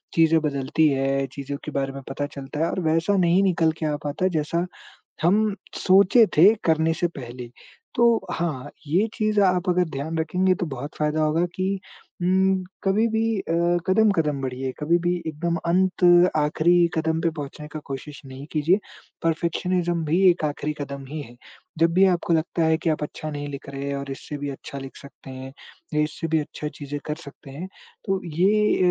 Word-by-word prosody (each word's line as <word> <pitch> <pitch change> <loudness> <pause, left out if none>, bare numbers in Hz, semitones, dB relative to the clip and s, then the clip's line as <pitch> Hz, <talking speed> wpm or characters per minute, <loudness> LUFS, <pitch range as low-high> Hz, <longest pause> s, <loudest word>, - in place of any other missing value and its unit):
चीज़ें 165 0 +5
बदलती 150 +1 +1
है, 135 0 0
चीज़ों 140 0 -5
के 150 - -5
बारे 135 0 -2
में 135 - -7
पता 145 +1 -2
चलता 140 +2 -6
है 165 - +2
और - - -2
वैसा 165 +5 +2
नहीं 180 +1 +4
निकल 165 -4 +3
के 160 - -2
आ 150 - 0
पाता 150 +6 0
जैसा 170 +4 -1 0.6
हम 205 +3 +3 0.3
सोचे 200 +5 +6
थे 195 +7 +8
करने 160 0 +3
से 175 - +3
पहले। 120 -1 -8 0.5
तो 235 - +4 0.3
हाँ, 145 -5 -3 0.2
ये 185 +9 +2
चीज़ 215 -1 +1
आप 180 -1 +2
अगर 180 0 +3
ध्यान 155 +3 -4
रखेंगे 185 +4 +2
तो 175 - -2
बहुत 140 +2 -6
फायदा 150 +1 +1
होगा 160 +3 +2
कि 190 +1 -1 0.4
उम, 190 +1 +2 0.2
कभी 210 +4 +3
भी 220 0 0 0.2
अ, 165 - -3 0.3
कदम-कदम 180 -9 +2
बढ़िए, 130 0 -3
कभी 165 +3 +2
भी 175 +1 0
एकदम 170 +2 -1
अंत 185 +1 +1 0.3
आखिरी 170 +3 +3
कदम 160 0 0
पे 170 - +2
पहुँचने 150 +1 -7
का 155 0 -7
कोशिश 140 +2 -7
नहीं 135 +1 -9
कीजिए, 160 +5 +3 0.5
परफेक्शनिज़्म 170 +1 0
भी 170 +5 +2
एक 170 -2 +1
आखिरी 150 +1 -2
कदम 140 -1 -6
ही 150 +1 -5
है। 120 -2 -12 0.4
जब 165 0 +3
भी 190 +2 +5
आपको 175 -2 +1
लगता 165 +1 0
है 160 0 +3
कि 165 - -1
आप 150 - -2
अच्छा 155 +1 -6
नहीं 145 0 -5
लिख 140 0 -8
रहे 140 0 -5
हैं 140 - -2
और 140 0 -5
इससे 145 +2 -6
भी 145 0 -4
अच्छा 140 0 -8
लिख 135 0 -9
सकते 140 -1 -13
हैं 130 +1 -8 0.4
या 150 - +3
इससे 150 +2 -2
भी 160 0 +2
अच्छा 150 0 -5
चीज़ें 145 0 -5
कर 150 - -2
सकते 140 -1 -12
हैं, 165 +7 -6 0.4
तो 195 -1 0
ये 195 +6 +2
160 Hz, 190 wpm, -24 LUFS, 145-180 Hz, 0.6 s, थे